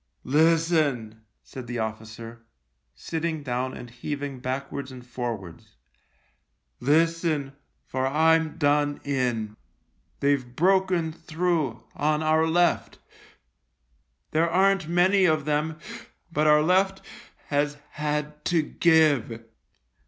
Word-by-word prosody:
" - - -43 0.2
Listen," 155 -9 +1 0.2
said 130 -2 -9
the 120 0 -4
officer, 110 +1 -6 0.5
sitting 160 - -3
down 130 0 -3
and 125 - -9
heaving 140 +3 -5
backwards 135 +1 -4
and 125 -1 -11
forwards. 115 -8 -6 0.5
" 60 0 -46
Listen, 165 -3 +1 0.3
for 130 0 -1
I'm 160 +2 +2
done 145 0 +1
in. 120 -6 -1 0.6
They've 140 -1 +2
broken 185 -1 +2
through 160 -8 -2
on 150 +1 0
our 160 +1 +3
left. 175 +1 +1 1.3
There 165 +2 +2
aren't 195 -1 +2
many 185 +3 +4
of 155 -4 +2
them, 155 +1 -1 0.5
but 155 -1 +1
our 150 0 +5
left 190 +3 +2 0.5
has 145 0 0
had 150 0 -3
to 170 -3 +2
give." 150 -9 +2
150 Hz, 110 wpm, -25 LUFS, 130-165 Hz, 1.3 s, our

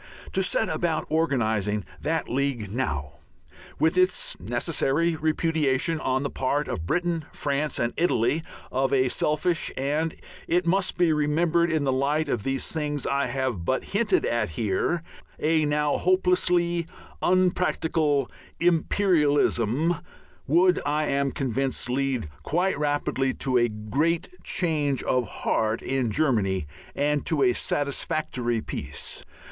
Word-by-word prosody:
To - - +1
set - - +1
about 165 -3 -1
organizing 110 - +1 0.2
that 160 +2 -1
League 125 -6 -1
now, 75 - -3 0.6
with 160 +4 +2
its 185 +1 +1
necessary 145 - 0
repudiation 155 -1 +1
on 130 -2 0
the 140 - -2
part 140 +3 -1
of 80 - -4
Britain, 170 - 0
France, 145 0 -1
and 120 0 0
Italy, 145 -3 +2 0.3
of 135 +1 +1
a 130 -2 +3
selfish 155 +6 0
and, 150 +4 -1 0.3
it 175 +1 +2
must 185 +2 +1
be 175 -3 +3
remembered 165 +3 +2
in 160 -3 +1
the 135 - +1
light 145 +3 0
of 120 - 0
these 135 +3 -1
things 150 -3 -2
I 140 -1 +1
have 125 -7 -2
but 130 +10 0
hinted 205 -1 +1
at 115 -3 0
here, 105 - -1 0.3
a 155 0 +2
now 150 0 +1
hopelessly 180 -2 +2 0.3
unpracticable 165 -5 +2 0.3
imperialism, 160 - +2 0.5
would, 175 +5 +4
I 150 +1 0
am 140 0 +1
convinced, 135 -1 -2
lead 130 - 0
quite 180 +5 0
rapidly 145 -3 0
to 130 -2 +1
a 120 0 +2
great 145 - -1
change 150 -6 0
of 125 -3 +1
heart 110 +3 -1
in 130 -3 0
Germany 105 - +1 0.3
and 145 +1 +1
to 150 -4 +2
a 125 -1 +4
satisfactory 125 -4 -1
peace. - - -5
145 Hz, 130 wpm, -26 LUFS, 130-165 Hz, 0.6 s, would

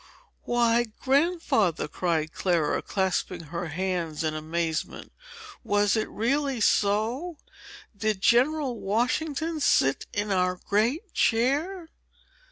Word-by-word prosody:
"Why! 240 0 +2
Grandfather," 270 - +1
cried 160 -1 -1
Clara, 170 -5 0
clasping 185 -2 -1
her 175 0 -3
hands 170 -1 -2
in 155 -1 -1
amazement, 160 +1 -3 0.5
"was 205 0 +2
it 220 - -1
really 270 +3 -1
so? 225 - +1 0.6
Did 215 -1 -1
General 255 +3 +2
Washington 290 +9 -1
sit 135 - +2
in 205 0 -2
our 180 -1 +1
great 235 - -1
chair?" 300 +10 +1
215 Hz, 100 wpm, -26 LUFS, 180-270 Hz, 0.6 s, Why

